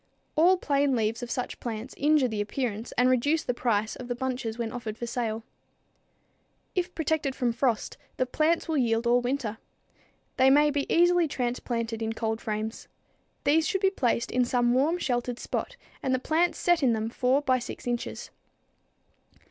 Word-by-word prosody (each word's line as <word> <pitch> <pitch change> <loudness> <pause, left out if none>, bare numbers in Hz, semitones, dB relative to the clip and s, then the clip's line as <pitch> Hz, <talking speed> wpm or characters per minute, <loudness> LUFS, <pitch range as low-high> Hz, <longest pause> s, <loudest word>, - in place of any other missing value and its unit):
All 355 +4 +5
plain 280 -4 +1
leaves 225 0 0
of 245 - -5
such 250 - -3
plants 230 +1 -5
injure 295 -2 +3
the 215 -3 -2
appearance 225 0 -3
and 250 - +3
reduce 285 +6 +2
the 245 - -1
price 220 -3 0
of 250 - -8
the 245 - -2
bunches 250 -3 -3
when 230 -2 -3
offered 225 -3 -5
for 240 - -4
sale. 230 -2 -2 1.3
If 360 -1 -2
protected 310 -4 0
from 240 -2 0
frost, 235 -2 -1 0.2
the 255 - +2
plants 310 +6 +1
will 315 -3 +1
yield 230 -1 +1
all 240 +1 +4
winter. 245 -3 -2 0.8
They 260 0 +6
may 295 +2 +5
be 285 -1 -2
easily 350 0 +4
transplanted 240 -3 -2
in 225 0 -1
cold 225 0 -2
frames. 215 +1 -4 0.6
These 315 +3 +3
should 385 -3 0
be 385 -1 +4
placed 240 -9 0
in 250 - +2
some 245 0 +2
warm, 295 +7 +2
sheltered 245 -6 -1
spot - - -4 0.3
and 260 -1 +1
the - - +1
plants 325 +6 +1
set 350 -2 +2
in 255 -4 +3
them 220 +1 -2
4 260 +4 +2
by 255 -2 +2
6 245 - -8
inches. 240 -1 -3
250 Hz, 175 wpm, -27 LUFS, 230-290 Hz, 1.3 s, They